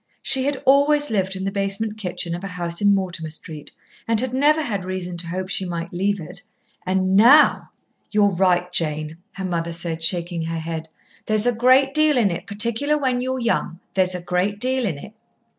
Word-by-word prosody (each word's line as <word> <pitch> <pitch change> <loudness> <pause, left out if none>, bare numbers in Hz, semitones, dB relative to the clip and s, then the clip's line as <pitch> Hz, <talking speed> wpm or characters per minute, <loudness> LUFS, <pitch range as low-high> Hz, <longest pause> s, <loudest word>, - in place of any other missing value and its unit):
She 265 -1 +3
had 285 -1 -2
always 290 +1 +3
lived 190 -2 -1
in 190 - -5
the 195 - -1
basement 200 +2 -2
kitchen 180 -4 -3
of 175 +2 -6
a - - -4
house 175 -1 -4
in 205 -1 +4
Mortimer 180 -4 -4
Street 155 -1 -8 0.4
and 225 -1 +2
had 255 +1 0
never 300 +4 +3
had 205 -8 -3
reason 185 -1 -5
to 170 0 -7
hope 185 +2 -4
she 195 - -1
might 170 -1 -5
leave 200 +3 0
it. 155 - -7 0.5
And 190 0 +1
now! 255 +9 +6 0.4
"You're 205 -2 +2
right, 180 0 +1
Jane!" 155 -1 0 0.2
her 190 - -5
mother 170 -2 -2
said, 165 -1 -3
shaking 170 0 0
her 165 0 -3
head. 160 0 -5 0.4
"There's 215 0 +3
a 245 - +3
great 255 +4 +4
deal 305 -2 +3
in 210 -6 +3
it, 175 +3 -6
particular 235 +9 +1
when 255 -3 0
you're 260 +1 -2
young. 230 -8 -1
There's 185 -1 +1
a 180 - -5
great 180 +4 -1
deal 255 0 0
in 160 -7 -3
it." 210 +9 -11
195 Hz, 200 wpm, -22 LUFS, 175-235 Hz, 0.5 s, now